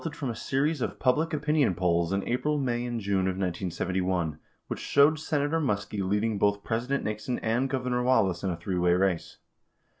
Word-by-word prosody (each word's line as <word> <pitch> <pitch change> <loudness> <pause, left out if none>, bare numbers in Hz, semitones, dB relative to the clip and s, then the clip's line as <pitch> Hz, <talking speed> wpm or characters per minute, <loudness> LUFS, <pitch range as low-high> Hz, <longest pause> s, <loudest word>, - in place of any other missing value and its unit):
159 165 - -6
from 135 -5 -2
a - - -9
series 145 +2 +1
of - - -2
public 150 +5 +2
opinion 150 - +1
polls 85 -1 +1
in 100 0 -1
April, 150 +5 0
May, 120 -3 -1
and 120 -1 -3
June 100 -2 0
of 95 -1 -1
1971, 90 -2 -1 0.3
which - - -5
showed 145 +2 +4
Senator 155 0 0
Muskie 105 -7 -1
leading 105 +2 0
both 100 0 +2
President 125 +5 -1
Nixon 110 +4 -3
and 120 +4 0
Gov 130 -2 -2
ernor 125 -1 0
Wallace 95 -8 +2
in 95 - 0
a 85 - -2
three 90 +2 -2
way 90 0 +3
race. 90 -2 0
110 Hz, 190 wpm, -28 LUFS, 95-135 Hz, 0.3 s, showed